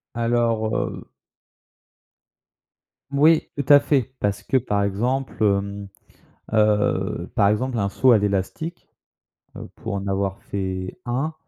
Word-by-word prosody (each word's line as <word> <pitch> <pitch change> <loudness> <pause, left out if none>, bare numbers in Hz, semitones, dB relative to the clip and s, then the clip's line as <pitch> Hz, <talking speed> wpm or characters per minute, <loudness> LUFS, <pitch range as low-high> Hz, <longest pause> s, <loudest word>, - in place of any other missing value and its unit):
Alors 115 -2 0
heu - - -3 2.1
Oui, 155 +3 +4
tout 140 -2 -3
à 145 - +10
fait, 130 -3 0
parce 100 -1 -1
que 135 - +1
par 105 -5 0
exemple, 120 +7 -1
hem, 100 0 0 0.7
heu, 105 -1 +1
par 100 - +4
exemple 125 +3 -1
un 100 - 0
saut 130 +5 +3
à 115 - +7
l'élastique, 105 - -3 0.7
heu, - - -8
pour 110 -3 -6
en 100 0 -4
avoir 95 0 -2
fait 95 -2 -4
un, 135 +6 -2
110 Hz, 125 wpm, -23 LUFS, 100-130 Hz, 2.1 s, à